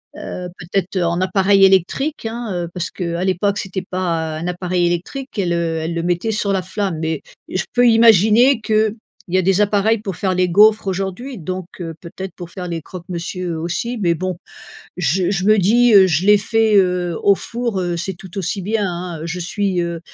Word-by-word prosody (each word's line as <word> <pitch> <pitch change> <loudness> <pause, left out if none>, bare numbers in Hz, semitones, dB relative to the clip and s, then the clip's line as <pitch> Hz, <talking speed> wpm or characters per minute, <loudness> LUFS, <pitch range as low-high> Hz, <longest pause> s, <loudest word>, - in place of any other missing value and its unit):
Heu, 180 0 -6
peut-être 190 +2 -3
en 170 +1 0
appareil 195 +1 +4
électrique 195 - +1
hein, 230 0 -4
heu, - - -4
parce 175 -2 -3
que 170 -3 -4
à 180 - -1
l'époque, 195 +2 0
c'était 190 -1 -5
pas 165 -4 -2
un 165 - -4
appareil 180 0 0
électrique, 215 +10 -4
elle, 175 -3 0
heu, 165 -1 -1
elle 165 +1 -3
le 170 - -2
mettait 175 +6 -1
sur 210 -2 -1
la 190 -2 0
flamme 185 -4 -3
et 160 -2 -2 0.3
je 185 - -2
peux 245 0 +4
imaginer 225 +3 +5
qu'il 215 0 +1 0.3
y 185 - +1
a - - +4
des 195 +2 +2
appareils 210 +2 +2
pour 195 -4 -5
faire 185 0 -1
les 180 0 +2
gaufres 210 +2 +5
aujourd'hui 195 +7 -3
donc 185 +2 -5 0.2
heu, 165 -1 -5
peut-être 185 +2 -8
pour 175 -2 -9
faire 180 0 -7
les 165 -1 -3
croque 180 +2 -10
monsieur 175 -1 -4
aussi, 205 +9 -3
mais 170 -3 +2
bon. 185 +1 -3 0.6
Je 180 +3 +1
je 185 -2 -1
me 215 0 +5
dis, 230 +5 +4
heu: 190 -1 +8
«Je 170 +2 +1
l'ai 210 0 +7
fait, 220 +1 +2
heu, 180 -3 +1
au 200 - +6
four, 235 -4 -3
heu, 175 -1 -2
c'est 190 +3 -3
tout 185 +2 -11
aussi 190 +1 -2
bien, 210 +2 -1
hein». 175 -2 -5
Je 170 +2 -4
suis, 185 0 -1
heu 170 -1 -3
185 Hz, 205 wpm, -19 LUFS, 175-210 Hz, 0.6 s, heu